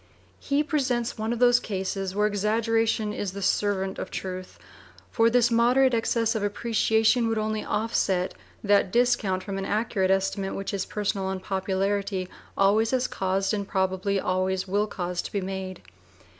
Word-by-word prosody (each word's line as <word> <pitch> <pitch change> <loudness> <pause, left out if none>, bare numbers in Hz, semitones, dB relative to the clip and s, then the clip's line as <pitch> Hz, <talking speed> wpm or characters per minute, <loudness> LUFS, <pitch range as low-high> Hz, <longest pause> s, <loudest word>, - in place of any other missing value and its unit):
He 290 +1 +1
presents 255 -7 -1
one 220 +1 -1
of 240 - -1
those 245 0 +5
cases 190 -2 -3
where 210 +1 +2
exaggeration 220 +1 +1
is 195 -3 -4
the 200 - -6
servant 195 -1 0
of - - -5
truth; 185 -1 -6 0.5
for 230 0 +4
this 240 0 +3
moderate 250 +3 +4
excess 230 0 +1
of 220 - -2
appreciation 225 +2 +2
would 225 0 0
only 215 0 -1
offset 205 -4 0 0.3
that 200 -2 +3
discount 235 -6 +2
from 195 -1 -4
an 195 - -3
accurate 205 -2 0
estimate 195 0 0
which 195 - -4
his 195 -2 -3
personal 200 -2 -2
unpopularity 190 0 -1 0.3
always 210 +3 +3
has 255 -1 +1
caused, 195 +2 -1
and 200 -2 -2
probably 190 0 0
always 185 +1 -1
will 205 +3 +1
cause, 180 -3 -3
to - - -8
be 200 - -1
made. 190 - -5
205 Hz, 155 wpm, -26 LUFS, 190-225 Hz, 0.5 s, those